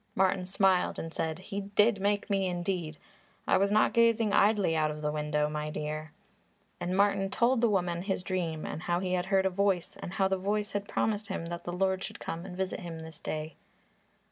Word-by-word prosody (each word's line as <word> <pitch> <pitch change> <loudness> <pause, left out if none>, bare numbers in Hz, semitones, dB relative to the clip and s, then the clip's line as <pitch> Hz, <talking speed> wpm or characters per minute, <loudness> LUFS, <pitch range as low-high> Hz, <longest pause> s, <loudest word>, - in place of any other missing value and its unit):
Martin 185 -1 +2
smiled 190 -1 +2
and 165 0 -5
said, 160 -1 -2
"He 200 +2 -5
did 205 +1 +2
make 205 0 +1
me, 195 -2 +1
indeed! 175 -3 -2 0.5
I - - +4
was 200 +1 +2
not 215 +1 +4
gazing 230 -2 +3
idly 200 -5 +4
out 155 -1 +2
of 150 0 -6
the 150 - +1
window, 150 0 0
my 150 0 -3
dear." 155 +1 -4 0.7
And 180 +2 -1
Martin 200 -1 +3
told 235 +4 +2
the 235 - +4
woman 175 -4 0
his 190 -1 -2
dream 170 -4 -2
and - - -5
how 175 +1 0
he 185 0 -2
had 180 0 0
heard 190 -1 +3
a 190 - +2
voice 195 -2 0
and 175 - -6
how 195 -1 +2
the 190 0 0
voice 205 +2 -1
had 205 0 -3
promised 210 -1 -1
him 190 -4 -4
that 170 0 -6
the 175 - -3
Lord 190 +1 0
should - - -7
come 170 +3 -5
and 180 -1 -8
visit 190 0 -2
him 170 -2 -6
this 160 -1 -10
day. 155 0 -5
185 Hz, 215 wpm, -30 LUFS, 165-200 Hz, 0.7 s, I